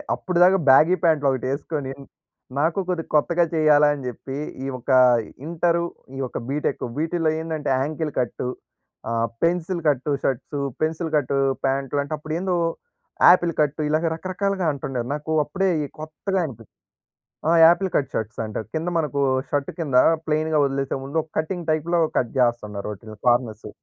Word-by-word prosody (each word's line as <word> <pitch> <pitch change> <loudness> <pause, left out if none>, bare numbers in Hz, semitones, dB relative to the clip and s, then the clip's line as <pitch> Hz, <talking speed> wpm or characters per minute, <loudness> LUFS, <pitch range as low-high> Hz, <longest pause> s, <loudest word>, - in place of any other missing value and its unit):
అప్పటిదాకా 180 +1 +3
బ్యాగీ 155 +7 +6
ప్యాంట్ల్‌లొకటి 140 -6 +2
వేసుకొని, 140 -1 -3 0.7
నాకు 160 +5 +1
కొద్దిగా 175 -3 -3
కొత్తగా 170 +3 +3
చేయాల 150 -2 +5
అని 140 -3 -7
జెప్పి, 135 +3 -6 0.3
ఈ - - -4
యొక్క 130 +1 -4 0.5
ఇంటరు, 170 +1 +1 0.3
ఈ - - -7
యొక్క 125 - -5
బీటెకు. 145 -2 -1
వీటిలో 165 0 0
ఏందంటే, 160 -3 -3
యాంకిల్ 155 +1 -2
కట్టు. 125 0 -2 0.6
ఆహ్, 115 0 0 0.2
పెన్సిల్ 175 +1 0
కట్టు 145 +1 0
షర్ట్స్, 135 +2 -2 0.2
పెన్సిల్ 160 +1 -1
కట్టు 140 -1 0 0.3
ప్యాంట్‌లు, 135 +1 0
అంటే 145 - -6
అప్పుడు 155 +1 -5
ఏందో 185 -1 0 0.7
యాపిల్ 175 -2 +5
కట్టు. 150 +1 0
ఇలాగ 155 +2 +1
రకరకాలుగా 185 +2 -2
అంటుండే. 135 -2 -4
నాకు 150 +2 -5
అప్పుడే 190 +6 0
ఈ - - -2
కొత్తగా 155 +5 -3
అనిపించింది. 115 -7 -10 0.8
ఆ! - - +4 0.2
ఆపిల్ 185 +2 0
కట్ 140 -1 +1
షర్ట్స్ 110 -1 -4
అంటారు. 110 0 -5
కింద 160 +2 -1
మనకు 145 -2 -1 0.3
షర్ట్ 145 -1 -1
కింద 140 -6 +1 0.3
ప్లెయిన్‌గా 155 0 +1
వదిలేసే 135 0 -2
ముందు 140 +4 -1
ఒక 160 - -24
కటింగ్ 170 +1 -4
టైప్‌లో 170 +2 +1 0.2
కట్ 120 -3 0
జేస్తున్నారు 105 -5 0
ఒకటి 110 +2 -11
కార్నర్స్. 120 -3 +1
150 Hz, 150 wpm, -23 LUFS, 135-165 Hz, 0.8 s, బ్యాగీ